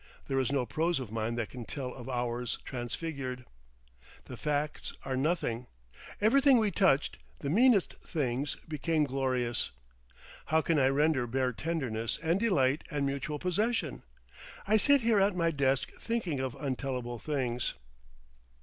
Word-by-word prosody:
There 135 -1 +1
is 130 0 0
no 135 -3 +1
prose 165 +4 0
of 125 -5 -6
mine 115 +1 -1
that 115 -2 -3
can 125 -2 -7
tell 125 +1 -5
of 130 0 -9
hours 120 -1 -2
transfigured. 130 0 -4 0.8
The 125 - -8
facts 150 +3 -2
are 135 -1 -1
nothing. 130 -5 0 0.5
Everything 270 +5 +5
we 215 -3 +2
touched, 170 -9 +3 0.2
the 140 - -1
meanest 225 0 +4
things, 140 -2 -1
became 155 0 +1
glorious. 130 -3 0 0.8
How 160 - +4
can 165 -3 +2
I 130 - +5
render 140 -2 +2
bare 130 +1 0
tenderness 125 -7 -2
and 165 +4 +2
delight 150 - +2
and 145 -4 -1
mutual 140 +2 -2
possession? 185 - 0 0.7
I 215 - +4
sit 280 +5 +5
here 225 -3 +3
at 195 0 +3
my 165 -2 +2
desk 135 -3 +1
thinking 200 - -2
of 130 -2 -3
untellable 130 -4 -3
things. 125 -5 -1
140 Hz, 145 wpm, -31 LUFS, 125-165 Hz, 0.8 s, Everything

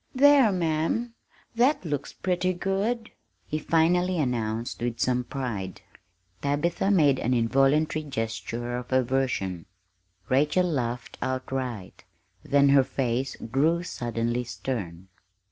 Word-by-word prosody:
"There, 275 -4 +6
ma'am, 175 +7 0 0.4
that 245 -1 +2
looks 145 -3 -3
pretty 185 0 -1
good!" 200 +6 -2 0.3
he 155 - -3
finally 175 +3 +2
announced 115 -6 -2
with 120 -1 -2
some 125 -1 +1
pride. 115 -9 -5 0.6
Tabitha 155 +7 0
made 150 -9 +4
an 125 +2 +1
involuntary 135 +6 +2
gesture 120 -2 -4
of 125 +1 -8
aversion. 125 -9 0 0.6
Rachel 150 +7 +2
laughed 125 -7 -3
outright; 130 -6 -4 0.4
then 140 0 +3
her 140 -1 +6
face 130 0 -2 0.2
grew 160 +6 +2
suddenly 120 -5 -2
stern. 95 -8 -5
135 Hz, 110 wpm, -26 LUFS, 120-170 Hz, 0.6 s, There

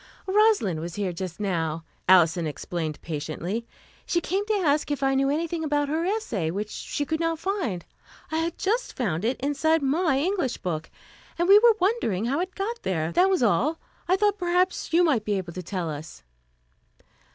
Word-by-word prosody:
"Rosalind 395 - +3
was 170 +1 -6
here 195 -3 -2
just 180 +1 -6
now," 165 -5 -1 0.3
Alison 175 -2 +5
explained 155 0 -4
patiently. 165 +8 -4 0.4
"She 345 - +2
came 380 +4 -1
to 435 - +1
ask 305 -8 +1
if 285 -2 -2
I 270 0 +3
knew 270 0 +2
anything 325 +2 -1
about 290 -2 0
her 320 +3 0
essay, 355 - -1
which 205 +5 -3
she 290 - -3
could 315 +2 -2
not 330 0 0
find. 330 - -2 0.5
I 315 - 0
had 325 +1 -1
just 445 +5 -1
found 190 -8 -1
it 240 +4 0
inside 290 +3 +1
my 295 +1 +2
English 335 - 0
book, 165 -3 -4 0.5
and 345 +1 +1
we 400 +2 +9
were 460 0 +6
wondering 360 - +1
how 275 +6 0
it 370 +1 -3
got 450 +4 -3
there. 160 -3 -1
That 370 - +4
was 375 -8 +2
all. 245 - +2 0.3
I 365 - +4
thought 415 +1 +1
perhaps 360 0 +1
you 340 +2 +5
might 280 -11 +2
be 210 - -1
able 175 -3 -5
to 185 - -5
tell 180 -1 -3
us." 155 +1 -7
280 Hz, 185 wpm, -26 LUFS, -, 0.5 s, we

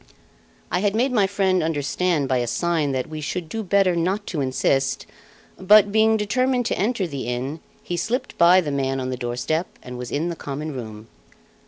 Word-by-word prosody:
I - - +1
had 205 +1 0
made 250 +4 +2
my 210 -6 +3
friend 190 -2 +1
understand 160 0 0
by 130 0 +1
a 120 - -1
sign 160 +2 0
that 130 -1 -1
we 155 -1 -6
should 165 +3 -4
do 225 +7 -4
better 195 -2 +2
not 190 +5 -1
to 150 - -1
insist; 135 0 0 0.5
but, 205 +2 +6
being 220 +1 +4
determined 250 +4 0
to - - 0
enter 215 -1 0
the 140 -7 -5
inn, 130 +6 -3 0.2
he 175 - -3
slipped 240 +8 -2
by 180 +2 +6
the 150 -4 -3
man 135 -1 -1
on 130 0 -3
the - - -2
doorstep 125 +8 -2 0.2
and 125 0 -8
was 125 -1 -5
in 160 +4 -1
the 170 - -4
common 150 +1 -5
room. 110 -4 -8
165 Hz, 195 wpm, -23 LUFS, 135-200 Hz, 0.5 s, but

